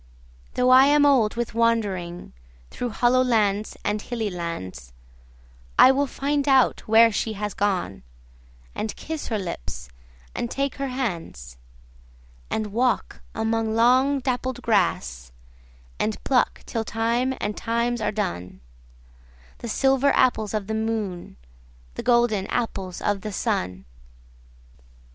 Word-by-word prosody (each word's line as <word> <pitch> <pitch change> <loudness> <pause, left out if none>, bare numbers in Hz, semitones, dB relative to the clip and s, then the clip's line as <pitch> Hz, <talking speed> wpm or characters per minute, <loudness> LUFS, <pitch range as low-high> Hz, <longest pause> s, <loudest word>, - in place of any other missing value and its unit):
Though 250 0 +3
I 260 +2 +8
am 290 0 +5
old 250 -7 +3
with 235 -1 -3
wanderingThrough 180 - -3
hollow 245 +3 +3
lands 215 -4 +1
and 210 0 0
hilly 225 -3 -3
lands,I - - -1
will 280 +1 +1
find 285 +2 -1
out 265 -2 +3
where 225 +1 +6
she 220 +1 -2
has 210 0 -4
gone, 185 - -1 0.7
And 215 - -4
kiss 320 -1 -6
her 220 - -1
lips 60 - -6 0.4
and 240 - -3
take 275 +1 -2
her 275 0 -2
hands; 170 - -5 0.9
And 215 -2 -3
walk 245 +1 0
among 220 0 0
long 255 +4 +4
dappled 255 -1 -2
grass, 65 - 0 0.7
And 215 0 -1
pluck 255 -2 +1
till 225 - -3
time 235 +4 0
and 210 0 -2
times 235 +1 -1
are 210 - 0
done, 175 - -4 1.0
The 235 - -6
silver 270 +3 +3
apples 220 -5 +2
of 210 -2 -2
the 220 - -4
moon, 220 - -3 0.6
The - - -5
golden 235 -5 +2
apples 195 -7 -3
of 205 -2 0
the 215 - -5
sun. 90 - -2
220 Hz, 125 wpm, -24 LUFS, 180-245 Hz, 1.0 s, I